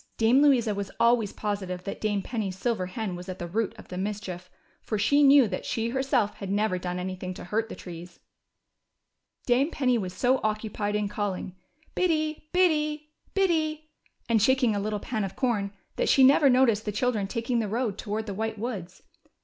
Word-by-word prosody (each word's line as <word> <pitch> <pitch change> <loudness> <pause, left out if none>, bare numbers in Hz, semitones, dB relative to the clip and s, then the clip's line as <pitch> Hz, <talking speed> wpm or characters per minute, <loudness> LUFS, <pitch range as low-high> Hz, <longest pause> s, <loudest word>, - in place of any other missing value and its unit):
Dame 230 +5 +4
Louisa 250 -7 +4
was 200 -1 -4
always 235 -3 +3
positive 190 -4 -4
that 195 - -6
Dame 205 -2 0
Penny's 200 -5 -3
silver 195 -3 -1
hen 190 0 -4
was 180 +2 -8
at 185 - -5
the 175 - -5
root 210 +5 -2
of - - -13
the 180 - -5
mischief, 190 -3 -5 0.3
for 215 - -3
she 285 +8 +3
knew 280 -3 +7
that 185 -2 -4
she 230 0 -2
herself 260 -4 0
had 195 - -6
never 200 -2 +1
done 180 0 -3
anything 185 0 -4
to - - -8
hurt 220 +5 -1
the - - -6
trees. 175 0 -10 1.3
Dame 260 +5 +3
Penny 250 -7 +1
was 185 -3 -4
so 255 +1 +2
occupied 215 -1 -2
in 210 -1 0
calling 200 -3 -3 0.4
Biddy, 310 -3 0
Biddy, 305 -4 +1 0.2
Biddy," 315 -5 0 0.4
and 230 -2 +3
shaking 250 -1 +3
a - - 0
little 210 +1 -2
pan 220 0 -3
of 195 - -5
corn, 215 -7 0 0.3
that - - +1
she 270 - +6
never 275 +2 +6
noticed 250 -4 +3
the 210 - -1
children 210 -1 0
taking 235 +2 -1
the 220 - -1
road 220 -1 -2
toward 215 0 -3
the 205 - -4
White 220 +2 -3
Woods. 200 -6 -6
220 Hz, 190 wpm, -27 LUFS, 195-255 Hz, 1.3 s, knew